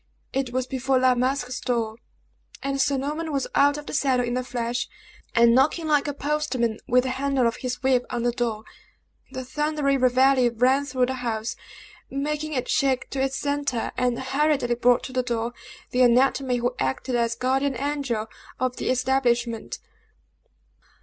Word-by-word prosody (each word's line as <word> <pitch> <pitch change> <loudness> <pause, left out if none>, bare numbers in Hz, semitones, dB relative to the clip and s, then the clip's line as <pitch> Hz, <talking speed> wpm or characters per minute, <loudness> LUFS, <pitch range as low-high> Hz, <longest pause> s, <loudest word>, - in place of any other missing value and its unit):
It 265 -2 -1
was 255 0 -1
before 265 0 0
La 255 0 +4
Masque's 255 0 -1
door; 230 -3 -1 0.7
and 275 0 0
Sir 280 0 +2
Norman 305 +4 -3
was 275 -2 0
out 285 +1 +4
of 295 - -7
the - - -7
saddle 260 -4 +2
in 240 0 -2
a 255 - -1
flash, 240 -1 -3 0.5
and 235 0 +6
knocking 305 +6 +2
like 295 -1 +2
a 290 - -2
postman 280 -7 -1
with 250 +1 +4
the 260 - -2
handle 270 -1 0
of 230 - 0
his 250 0 -4
whip 255 -2 +2
on 240 -1 -2
the 240 - +2
door. 230 -3 -2 0.7
The 260 -1 -6
thundering 295 0 0
reveille 255 0 +4
rang 260 +4 +3
through 255 -2 +1
the 260 - -3
house, 225 -2 -2 0.5
making 300 +2 -3
it 255 -2 -2
shake 270 -3 +1
to 270 - -2
its 270 0 0
centre, 285 -4 -1
and 250 -1 0
hurriedly 270 -1 +1
brought 245 0 +3
to 260 - -7
the 255 - +2
door, 235 -1 -2 0.4
the 250 - +1
anatomy 255 +1 +3
who 245 +1 -1
acted 130 - -2
as 235 -1 +1
guardian 260 +1 0
angel 275 -6 -2 0.3
of 255 -1 -1
the - - -2
establishment. 250 -3 0
255 Hz, 170 wpm, -25 LUFS, 245-275 Hz, 0.7 s, and